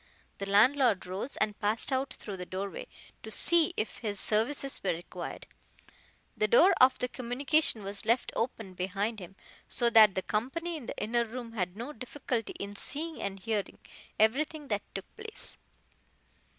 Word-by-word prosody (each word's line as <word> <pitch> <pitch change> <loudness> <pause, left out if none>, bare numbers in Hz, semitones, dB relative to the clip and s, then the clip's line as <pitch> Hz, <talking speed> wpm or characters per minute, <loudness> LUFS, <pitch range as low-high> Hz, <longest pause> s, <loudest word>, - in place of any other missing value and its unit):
The 200 0 -4
landlord 230 +1 +4
rose 190 +9 -4
and 210 -1 0
passed 215 +6 +1
out 265 0 0
through 200 -3 -7
the 180 - -5
doorway, 195 +1 -5 0.3
to - - -8
see 340 -2 +4
if 215 - -2
his 205 -4 -2
services 260 +6 0
were 190 - 0
required. 170 +1 -7 0.9
The 215 - +2
door 330 - +7
of 255 +1 +7 0.2
communication 255 -1 +2
was 200 +1 -4
left 235 +2 +1
open 225 -4 -2
behind 195 +5 -2
him, 185 +1 -10 0.3
so 240 -1 +2
that 215 -4 +8
the 190 - -1
company 320 +11 -2
in 280 -7 -8
the - - -5
inner 235 +3 +1
room 235 0 -7
had 185 -4 -3
no 245 +6 -5
difficulty 245 -2 -4
in 200 0 -7
seeing 315 +9 -3
and 195 0 -4
hearing 215 -1 -2 0.4
everything 285 +7 +1
that 205 -2 0
took 195 - -4
place. 440 0 -8
225 Hz, 160 wpm, -30 LUFS, 200-265 Hz, 0.9 s, that